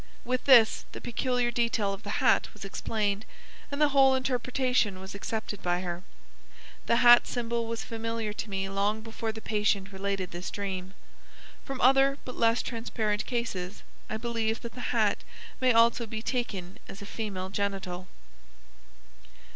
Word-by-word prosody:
With 255 +1 -1
this 240 -5 +6
the - - -6
peculiar 245 0 0
detail 230 -4 +1
of 195 - -8
the 205 -1 -3
hat - - +4
was 205 - -8
explained, 205 0 -1 0.5
and 280 - -3
the 300 -1 +5
whole 270 -1 +5
interpretation 250 -5 0
was 190 +1 -8
accepted 210 0 -4
by 175 0 0
her. 175 -1 -4 0.9
The - - +4
hat 240 0 +9
symbol 235 -1 -2
was 230 -1 -3
familiar 225 -1 -3
to 210 - -5
me 195 -1 -2
long 200 +2 0
before 225 0 -4
the 220 0 -9
patient 210 -2 0
related 195 -1 -3
this 175 +2 -5
dream. 190 -2 -4 0.7
From 270 -1 -5
other 270 +2 +5
but 250 - -6
less 230 0 +3
transparent 220 -3 -2
cases 210 -6 -3 0.3
I 220 - -2
believe 225 -1 -1
that 235 -1 -7
the 245 - -4
hat 220 -4 +2 0.4
may 255 -1 +4
also 230 0 +4
be 220 0 -5
taken 200 -9 -3
as 200 - -8
a - - -8
female 200 -3 -4
genital. 190 -2 -3
220 Hz, 155 wpm, -29 LUFS, 200-240 Hz, 0.9 s, hat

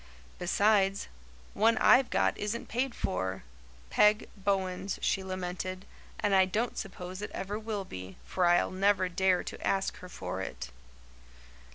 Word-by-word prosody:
"Besides, 195 +2 +2 0.5
one 225 +2 +3
I've 255 0 +6
got - - +2
isn't 210 +3 -3
paid 245 +2 -1
for 95 - -2 0.5
Peg 210 +1 +4
Bowen's," 195 -1 -1
she 195 - 0
lamented, 185 0 -4 0.3
"and 205 - +1
I 190 -1 +6
don't 220 +6 -1
suppose 185 0 -6
it 210 - -4
ever 205 +2 -3
will 215 -3 -4
be, 95 - -8
for 180 -2 +1
I'll 175 0 +3
never 190 0 +2
dare 185 0 +2
to - - -7
ask 195 0 0
her 180 - -10
for 95 - -5
it." 65 -8 -6
190 Hz, 145 wpm, -30 LUFS, 180-210 Hz, 0.5 s, I've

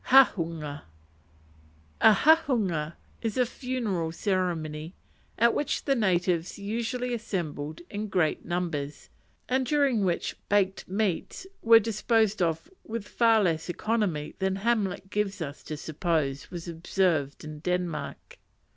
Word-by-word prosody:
Hahunga 165 - +4 1.2
A 220 - +9
hahunga 205 - +3 0.3
was 225 -1 -2
a 250 - +4
funeral 230 -10 -2
ceremony, 165 -4 -2 0.4
at 235 +1 +4
which 295 - -1
the 275 - +3
natives 180 -6 +1
usually 235 +4 -2
assembled 165 -9 -4
in 210 +1 -4
great 180 -6 +1
numbers, 165 -5 -3 0.4
and 260 +1 +2
during 270 -5 +2
which 175 -3 -1
"baked 195 -2 +1
meats" 200 - -1 0.2
were 230 0 +8
disposed 220 -1 +1
of 165 - 0 0.2
with 220 -2 -5
far 225 -2 +4
less 165 -2 0
economy 175 -7 -1
than 190 0 +1
Hamlet 195 -2 -1
gives 210 -1 -1
us 145 -4 -5
to 155 - -6
suppose 150 -3 -1
was 175 -1 -7
observed 165 -4 0
"in 155 0 -7
Denmark." 180 -2 -3
190 Hz, 120 wpm, -28 LUFS, 165-225 Hz, 1.2 s, A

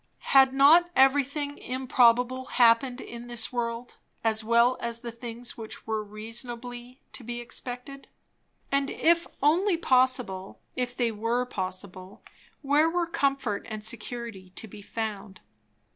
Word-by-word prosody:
Had 270 -1 +7
not 300 +6 +6
everything 285 +2 +2
improbable 250 0 +2
happened 245 +1 +3
in 235 -1 -9
this 240 0 -1
world, 235 0 -4 0.3
as 220 -1 +1
well 235 +3 +4
as 235 0 -4
the 235 - -6
things 235 +1 -7
which 220 -1 -9
were 220 -1 -2
reasonably 240 +4 -7
to 255 - -8
be 240 +1 -5
expected? 250 +3 -6 0.6
And 275 0 +1
if 335 +1 +2 0.2
only 345 +5 +3
possible, 255 - +1 0.2
if 250 -1 -3
they 240 -2 +1
were 230 +3 -1
possible, 185 -3 -6 0.4
where 295 +3 +3
were 345 +1 0
comfort 275 -9 -1
and 215 -1 -5
security 225 -3 -5
to 225 - -7
be 205 0 -12
found? 205 -3 -5
240 Hz, 130 wpm, -27 LUFS, 225-265 Hz, 0.6 s, Had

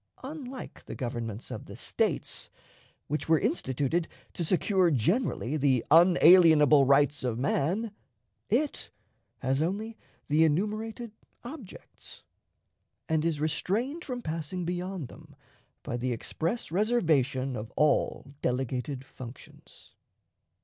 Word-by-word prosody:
Unlike 270 -2 -8
the - - -7
governments 120 -3 -5
of - - -7
the - - -9
States, - - -2 0.6
which 150 +2 -3
were 160 - +6
instituted 160 - 0 0.3
to 175 - -3
secure 185 +1 +2
generally 155 - 0
the 135 -4 +2
unalienable 160 -4 +7
rights 145 +1 +3
of 120 -3 -1
man, 165 - 0 0.6
it 300 -1 0 0.5
has 135 +2 +1
only 210 +7 -3 0.3
the 155 +2 +4
enumerated 215 +8 -1 0.3
objects, 245 - -11 0.8
and 160 -1 +1
is 165 -3 0
restrained 215 - -1
from 250 -3 -5
passing 165 +3 -4
beyond 180 -3 -3
them - - -15 0.5
by 120 - -3
the 125 +1 -2
express 165 - -3
reservation 155 - +1
of 110 0 -6
all 150 -3 +2 0.2
delegated 130 +1 -2
functions. 125 -1 -12
160 Hz, 110 wpm, -29 LUFS, 135-205 Hz, 0.8 s, unalienable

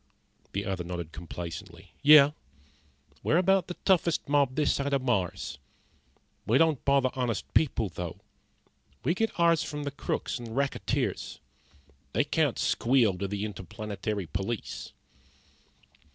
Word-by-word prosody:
The 100 +1 -2
other 95 -3 -2
nodded 85 -2 -5
complacently. 85 0 -8
"Yeah. 145 0 +8 0.9
We're 160 - +2
about 190 +1 +3
the 180 - -5
toughest 175 -4 +2
mob 140 -2 +2
this 150 0 +2
side 140 0 -1
of 135 -2 +1
Mars. 90 - -1 0.9
We 115 - +4
don't 160 -3 +3
bother 140 -2 +3
honest 120 -5 -2
people, 130 -8 +2
though. 85 +1 -6 0.8
We 150 +8 +2
get 225 0 -2
ours 170 -2 +4
from 150 0 -4
the 145 - -3
crooks 140 - -3
and 115 -1 -7
racketeers. 140 0 -1 0.8
They - - +3
can't - - +1
squeal 120 -5 +3
to 100 - -1
the 100 +1 -3
Interplanetary 105 0 -4
Police." 95 +8 -4
125 Hz, 130 wpm, -28 LUFS, 100-145 Hz, 0.9 s, Yeah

